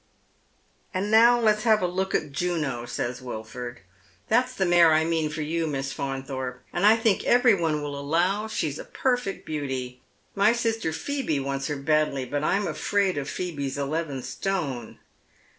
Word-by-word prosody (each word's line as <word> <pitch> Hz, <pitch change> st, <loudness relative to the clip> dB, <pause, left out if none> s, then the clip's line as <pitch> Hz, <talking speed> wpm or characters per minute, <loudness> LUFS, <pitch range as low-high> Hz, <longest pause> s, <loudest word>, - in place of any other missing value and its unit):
" -, -, -39 dB
And 200 Hz, +3 st, -1 dB
now 235 Hz, +2 st, +7 dB
let's 215 Hz, -2 st, +3 dB
have 215 Hz, -3 st, +3 dB
a -, -, +3 dB
look 190 Hz, +2 st, -1 dB
at 150 Hz, -, -1 dB
Juno," 145 Hz, -7 st, -2 dB
says 125 Hz, 0 st, -3 dB
Wilford. 120 Hz, 0 st, -7 dB, 0.2 s
" 100 Hz, -, -32 dB
That's 250 Hz, +3 st, +3 dB
the 190 Hz, -, +1 dB
mare 175 Hz, -2 st, +6 dB
I 160 Hz, +1 st, +3 dB
mean 160 Hz, -2 st, 0 dB
for 155 Hz, 0 st, -4 dB
you. 165 Hz, +2 st, -1 dB
Miss 135 Hz, -2 st, -3 dB
Faunthorpe, 135 Hz, -2 st, -4 dB
and 200 Hz, -, +3 dB
I 220 Hz, -, +7 dB
think 225 Hz, -3 st, +1 dB
every 245 Hz, -1 st, +5 dB
one 160 Hz, -5 st, 0 dB
will 145 Hz, -1 st, -4 dB
allow 175 Hz, +9 st, +1 dB
she's 155 Hz, -9 st, -2 dB
a -, -, -5 dB
perfect 245 Hz, -6 st, -1 dB
beauty. 130 Hz, -4 st, -4 dB, 0.3 s
My 205 Hz, +3 st, +4 dB
sister 225 Hz, -7 st, -1 dB
Phoebe 165 Hz, -, -2 dB
wants 135 Hz, 0 st, -2 dB
her 150 Hz, -, -2 dB
badly, 150 Hz, -2 st, +1 dB
but 145 Hz, +3 st, -2 dB
I'm 200 Hz, +6 st, +1 dB
afraid 200 Hz, -2 st, 0 dB
of 145 Hz, 0 st, -5 dB
Phoebe's 140 Hz, -7 st, -3 dB
eleven 140 Hz, -1 st, -2 dB
stone." 145 Hz, -, -3 dB
160 Hz, 175 wpm, -26 LUFS, 135-200 Hz, 0.3 s, now